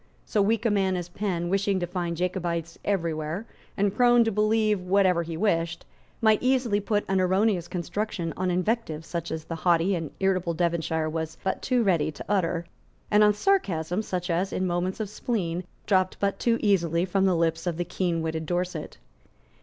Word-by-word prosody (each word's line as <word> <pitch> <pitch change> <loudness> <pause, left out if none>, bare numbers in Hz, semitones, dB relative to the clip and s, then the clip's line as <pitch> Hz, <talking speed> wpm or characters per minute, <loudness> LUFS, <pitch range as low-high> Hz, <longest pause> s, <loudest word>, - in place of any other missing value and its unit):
So 210 - +1
weak 220 +3 +1
a 230 - +3
man 190 -2 +2
as 175 -1 -5
Penn, 175 -2 -2
wishing 195 +1 +1
to 175 - -1
find 175 -1 -3
Jacobites 170 -2 -2
every 170 -5 0
where, 155 +7 -4 0.3
and 200 -1 +2
prone 240 -1 +5
to 225 - 0
believe 215 -1 +2
whatever 185 -1 +3
he 165 -1 -5
wished, 170 -4 0 0.4
might 220 -2 +4
easily 250 -5 +2
put 205 0 0
an 190 -1 +2
erroneous 185 -1 +2
construction 175 -1 -3
on 185 0 -1
invectives 180 -3 -1
such 170 0 -4
as 160 -1 -4
the 165 - -5
haughty 175 +2 +3
and 165 -4 -2
irritable 185 -3 +1
Devonshire 165 -2 0
was 160 0 -4
but 190 - -1
too 250 -2 +1
ready 165 -6 +2
to - - -9
utter, 175 -4 0 0.5
and 210 0 +6
on 210 -1 +5
sarcasms 205 - 0
such 180 -1 -2
as, 180 +4 0
in 185 - -1
moments 180 +2 -1
of 215 - -2
spleen, 185 -5 -2 0.2
dropped 185 -2 +1
but 200 -1 0
too 230 -1 +2
easily 170 -4 +2
from 190 +1 +1
the 185 - +3
lips 165 +1 0
of 170 -2 -1
the 175 - -1
keenwitted 160 -3 -2
Dorset. 175 -3 -3
180 Hz, 185 wpm, -26 LUFS, 170-205 Hz, 0.5 s, and